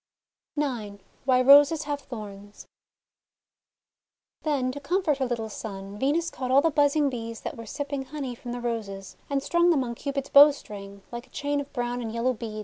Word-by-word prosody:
IX 235 -9 -2 0.3
WHY 255 -1 +4
ROSES 290 +3 +7
HAVE 290 -1 -3
THORNS 205 -5 -9 1.8
THEN 275 -5 0
to 285 - -7
comfort 315 -1 0
her 260 - +1
little 235 -2 -2
son, 200 -1 -7
Venus 315 +6 +1
caught 255 -1 -4
all 265 +2 +6
the 330 - +2
buzzing 290 0 +3
Bees 230 -3 -5
that - - -5
were 230 -1 -9
sipping 280 +1 -4
honey 270 -2 -5
from 240 0 -8
the 245 0 -4
Roses, 205 -5 -4
and 275 -1 0
strung 345 +2 +3
them 295 -6 +3
on 235 -1 -4
Cupid's 275 +2 -4
bowstring 210 -9 +4
like 240 +2 -7
a - - -28
chain 285 +1 -1
of 285 - -10
brown 245 -1 -2
and 225 -2 -4
yellow 235 +3 0
beads. 220 -2 -6
255 Hz, 180 wpm, -26 LUFS, 230-285 Hz, 1.8 s, ROSES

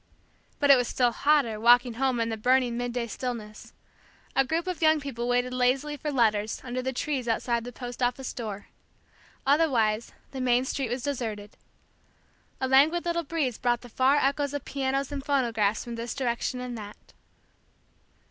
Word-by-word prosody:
But 285 -1 +5
it 275 - +8
was 245 -1 0
still 245 -2 +2
hotter, 270 -4 +2
walking 240 +1 +5
home 255 0 0
in 230 0 0
the 225 - -2
burning 245 +2 +2
midday 245 0 -2
stillness. 230 -3 -6 0.6
A 270 - +5
group 320 +6 -1
of 365 -2 -4
young 315 -1 +5
people 250 -4 -4
waited 245 +1 +1
lazily 260 +4 +1
for 295 +1 -4
letters, 215 -5 +1
under 255 0 -3
the 260 +1 -2
trees 260 -1 -2
outside 235 +1 0
the 245 - -6
post 245 +1 -8
office 250 +1 -1
door. 210 -4 -6 0.8
Otherwise 245 -7 +2 0.2
the 265 -1 -5
main 250 0 +2
street 265 -2 -2
was 245 +1 -3
deserted. 220 -7 -4 1.0
A 260 - 0
languid 300 +7 +4
little 340 0 0
breeze 280 -7 -2
brought 240 -1 +1
the 245 - -12
far 260 +4 +3
echoes 285 0 +1
of 285 - -5
pianos 275 0 -2
and 280 -1 -4
phonographs 230 -7 +1
from 240 - -7
this 230 0 -5
direction 250 -1 -2
and 250 -1 -5
that. 205 0 -12
250 Hz, 170 wpm, -27 LUFS, 235-275 Hz, 1.0 s, it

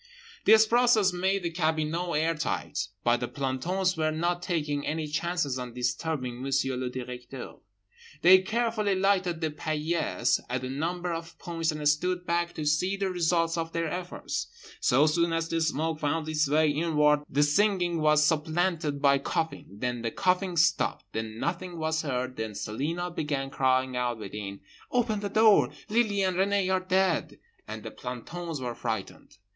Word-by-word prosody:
This 220 +1 +7
process 225 -4 +4
made 190 +2 0
the 170 - -1
cabinot 160 +1 -1
air 160 +2 +2
tight. 100 - -2 0.2
But 120 0 +3
the 120 - -2
plantons 170 +9 -1
were 155 -1 +1
not 175 +3 -1
taking 150 -5 -1
any 155 +1 -2
chances 150 -3 -1
on 125 -1 -7
disturbing 125 0 -2
Monsieur 135 -1 0
le 125 0 -2
Directeur. 125 0 -7 0.7
They 185 +2 +9
carefully 215 0 0
lighted 185 -3 +1
the 160 -1 0
paillasse 155 -3 0
at 125 +1 -2
a 130 - -4
number 175 +5 -2
of 165 0 -7
points 165 -1 -2
and 150 -1 -2
stood 180 +4 +1
back 170 0 0
to 155 - -4
see 180 +7 +1
the 195 -1 -1
results 170 -1 +1
of 165 0 -4
their 165 -1 -1
efforts. 180 +2 -4 0.3
So 135 +5 +4
soon 170 +2 +2
as 165 0 -1
the 165 - 0
smoke 160 0 0
found 155 +1 -1
its 155 -2 +1
way 155 +1 +3
inward 150 -1 +3
the 145 +2 +3
singing 175 +1 +2
was 150 0 +4
supplanted 160 -1 0
by 140 -1 +5
coughing; 160 +3 -2
then 120 +4 -3
the 115 - -1
coughing 180 - 0
stopped. 165 +2 +2
Then 110 0 -4
nothing 175 +5 -3
was 160 0 0
heard. 130 -3 -3
Then 110 -2 -4
Celina 165 - -3
began 145 -4 -2
crying 130 -1 +1
out 125 -1 -1
within—"Open 105 - -4
the 200 0 -3
door, 215 0 +5 0.2
Lily 210 -3 +2
and 185 -2 0
Renée 195 -1 +2
are 185 - +3
dead"—and 185 - -2
the 110 - -6
plantons 150 +8 -6
were 125 -2 -3
frightened. 110 -3 -5
160 Hz, 160 wpm, -28 LUFS, 135-180 Hz, 0.7 s, They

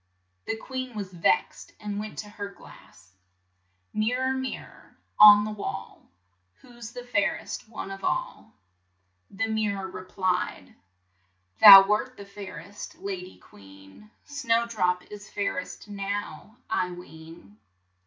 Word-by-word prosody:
The - - -2
queen 255 +1 -6
was 195 -3 -6
vexed 175 - 0
and 205 -1 -4
went 215 0 -7
to 210 - -6
her 205 -1 -6
glass: 95 - -17 0.4
" 90 +1 -46
Mir 215 +4 0
ror, 260 0 0
mir 260 0 -4
ror - - -18 0.2
on 210 0 +10
the 215 - -4
wall, 210 -1 -7 0.5
Who's 240 -3 -12
the 245 -1 -7
fair 210 -4 +1
est - - -8
one 210 -3 -7
of 195 0 -8
all?" - - -3 0.8
The 200 +3 -2
mir 220 -2 0
ror 190 -1 -6
re 185 - -8
plied: 185 - -2 0.9
"Thou 195 -1 +12
wert 235 +5 0
the 200 - -10
fair 200 -4 -9
est 200 +6 -10
la 200 - -4
dy 185 -1 -7
queen; 95 - -17 0.2
Snow 235 -5 0
drop 180 -6 0
is 205 0 -10
fair 200 -2 -2
est 185 - -9
now, 205 +2 -5
I 185 -4 0
ween." 160 - -13
205 Hz, 150 wpm, -26 LUFS, 180-220 Hz, 0.9 s, Thou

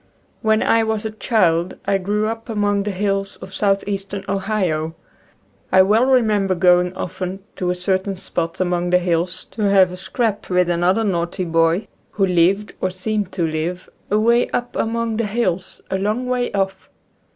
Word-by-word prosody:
When 220 0 +2
I 225 0 +3
was 220 -1 -2
a 220 - -2
child 185 -6 +1
I 195 0 +2
grew 205 +3 0
up 225 +1 -4
among 205 -2 +1
the 205 - -2
hills 195 0 -1
of 190 - -11
southeastern 195 -1 -1
Ohio. 185 -6 -1 0.8
I 190 - +7
well 220 +6 +3
remember 215 -7 +3
going 180 0 +4
often 185 +1 -5
to 180 - -1
a 180 - +1
certain 190 +2 -1
spot 170 -3 -4
among 175 -1 0
the 180 - +5
hills 175 0 -1
to 220 - -6
have 190 -2 +5
a 180 - -7
"scrap" 210 +3 -2
with 180 -1 +2
another 180 +5 +2
"naughty" 175 -2 -1
boy, 165 +4 +2 0.3
who 195 - +2
lived 185 +3 +2
or 185 - +1
seemed 195 +1 -2
to 175 -3 0
live, 160 +3 -3 0.2
away 230 +3 +3
up 245 0 -3
among 230 0 -1
the 230 -2 0
hills, 195 -4 -2
a 190 - 0
long 215 +6 -1
way 250 -1 -1
off. 195 -1 -2
195 Hz, 170 wpm, -20 LUFS, 180-215 Hz, 0.8 s, I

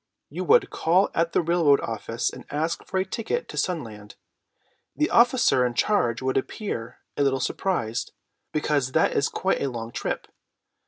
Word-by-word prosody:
You - - -4
would 445 -2 +4
call 180 +5 +2
at 165 0 +1
the - - +2
railroad 165 -4 +4
office 115 +1 -3
and - - -11
ask 155 +3 -2
for 190 - -2
a 190 - +1
ticket 230 - -3
to - - -8
Sunland. 110 - -4 0.8
The 305 - 0
officer 235 - +4
in 120 -1 -1
charge 120 - +1
would 130 0 0
appear 130 - -4
a - - -1
little 135 -1 +2
surprised, 120 - -2 0.4
because 145 -4 0
that - - +2
is 140 - +2
quite 190 - -1
a 140 - 0
long 115 -2 -6
trip. - - -3
145 Hz, 165 wpm, -25 LUFS, 120-190 Hz, 0.8 s, would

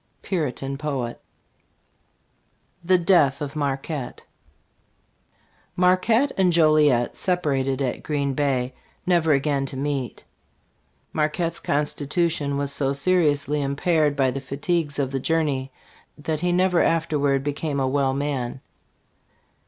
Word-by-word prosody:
Puritan 140 -6 -3
Poet. 135 -6 -3 1.6
THE 185 +2 +4
DEATH 170 -6 +3
OF 145 0 -5
MARQUETTE. 140 -2 -3 1.5
MARQUETTE. 185 +9 +3
and 185 -2 +4
Joliet 155 -7 +3
separated 140 -7 0
at 130 - -2
Green 140 -3 -1
Pay, 130 -3 0 0.3
never 170 -3 +3
again 140 -1 +1
to 135 - -6
meet. 140 -2 -3 0.9
Marquette's 160 +2 -1
constitution 145 0 -1
was 140 0 -1
so 140 -1 0
seriously 150 -1 +1
impaired 145 +1 +1
by 135 -2 +2
the 135 +2 -5
fatigues 145 +3 -2
of 135 -2 -1
the 135 - -1
journey 140 -3 0 0.5
that 155 +1 -3
he 175 +2 0
never 180 0 +3
after 165 -2 +1
ward 140 -1 +1
became 145 0 -2
a 135 - +1
well 135 0 +1
man. 135 -3 -2
145 Hz, 115 wpm, -23 LUFS, 135-165 Hz, 1.6 s, THE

